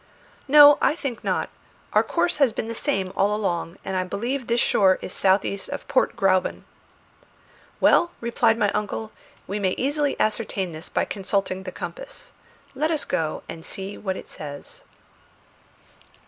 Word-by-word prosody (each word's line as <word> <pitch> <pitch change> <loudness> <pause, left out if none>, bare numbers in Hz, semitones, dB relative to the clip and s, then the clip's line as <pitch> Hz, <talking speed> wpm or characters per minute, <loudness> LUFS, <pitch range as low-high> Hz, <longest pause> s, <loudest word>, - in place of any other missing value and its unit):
"No, 290 +1 +8
I 295 - +3
think 275 -8 -5
not. - - -1 0.4
Our - - +6
course 350 - 0
has 275 -5 +4
been 220 - -4
the 230 - -4
same 195 -7 -1
all 205 +1 +2
along, 175 -5 -2
and 190 - -3
I 185 - +1
believe 235 +8 -3
this 235 +1 +1
shore 190 -5 +4
is - - -5
south 190 +1 +3
east 200 -1 -4
of - - -6
Port - - +1
Gräuben." 185 -1 +1 1.2
"Well," 345 - +5
replied 235 -1 +2
my 205 -3 +2
uncle, 210 +1 -3 0.3
"we 200 +2 -3
may 190 -2 0
easily 290 +1 0
ascertain 210 -4 -1
this 160 +2 -8
by - - 0
consulting 195 -1 -2
the 190 -1 -7
compass. - - -8 0.4
Let 300 +4 0
us 315 -3 0
go 155 -1 -2
and 160 - -8
see 195 +2 -6
what 190 -2 -3
it - - -9
says." 145 -2 -9
210 Hz, 160 wpm, -24 LUFS, 190-270 Hz, 1.2 s, No